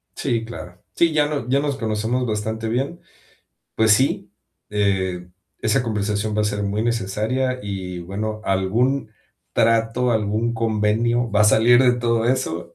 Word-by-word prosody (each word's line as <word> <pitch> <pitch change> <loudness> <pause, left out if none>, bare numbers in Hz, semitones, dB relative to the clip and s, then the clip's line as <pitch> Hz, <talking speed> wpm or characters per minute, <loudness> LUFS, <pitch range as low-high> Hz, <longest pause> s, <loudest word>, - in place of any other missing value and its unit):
Sí, 115 -4 -1
claro. 90 -6 -10
Sí, 165 -2 +3
ya 150 -1 +3
no 145 -5 -3
ya 135 +2 +2
nos 140 -2 -2
conocemos 110 +2 -1
bastante 110 0 -3
bien. 135 +9 -2 0.7
Pues 110 -1 +4
sí, 130 +5 0 0.4
eh, 95 -3 -1 0.3
esa 110 +4 +1
conversación 105 -1 -2
va 105 - +2
a - - 0
ser 105 0 -1
muy 100 +2 -1
necesaria 115 +4 -1
y, 95 -3 -5
bueno, 105 +5 -4
algún 110 +7 0 0.4
trato, 115 +2 +2
algún 110 +2 0
convenio 115 +2 +1
va 105 0 +2
a - - +6
salir 120 +4 +5
de 125 -1 +5
todo 115 -1 +1
eso. 125 -10 -2
110 Hz, 150 wpm, -22 LUFS, 105-120 Hz, 0.7 s, a